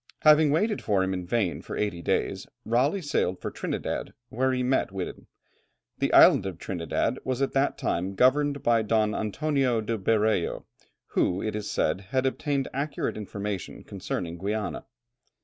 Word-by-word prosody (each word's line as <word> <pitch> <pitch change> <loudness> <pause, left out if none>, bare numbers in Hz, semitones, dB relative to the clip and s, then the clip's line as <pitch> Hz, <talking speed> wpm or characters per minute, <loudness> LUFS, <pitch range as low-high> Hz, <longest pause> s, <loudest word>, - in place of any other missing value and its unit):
Having 155 0 +6
waited 205 +9 +1
for 100 -2 +1
him 95 0 -1
in 90 -1 -4
vain 90 -9 0
for - - -6
eighty 100 -5 -1
days, - - -1 0.2
Raleigh 140 - +1
sailed 95 - 0
for - - -4
Trinidad, - - -4
where 130 +3 +1
he 125 -1 0
met 130 -5 +1
Whiddon. 95 -2 -6 0.7
The - - +1
island - - +7
of 90 -4 -5
Trinidad 95 +8 -2
was 130 -1 -2
at 135 - +1
that 135 +1 +1
time 95 +3 -2
governed 140 +4 +3
by 115 -1 +3
Don 110 -1 +1
Antonio 130 +2 0
de 110 0 -2
Berreo, 110 -2 +1 0.4
who, 90 +2 +1
it 110 -1 -2
is 105 -1 -4
said, 80 +5 0
had 130 +2 +1
obtained 140 +1 -1
accurate 140 +2 -2
information 100 -2 -5
concerning 90 -3 -5
Guiana. 105 +3 -3
110 Hz, 160 wpm, -27 LUFS, 95-135 Hz, 0.7 s, island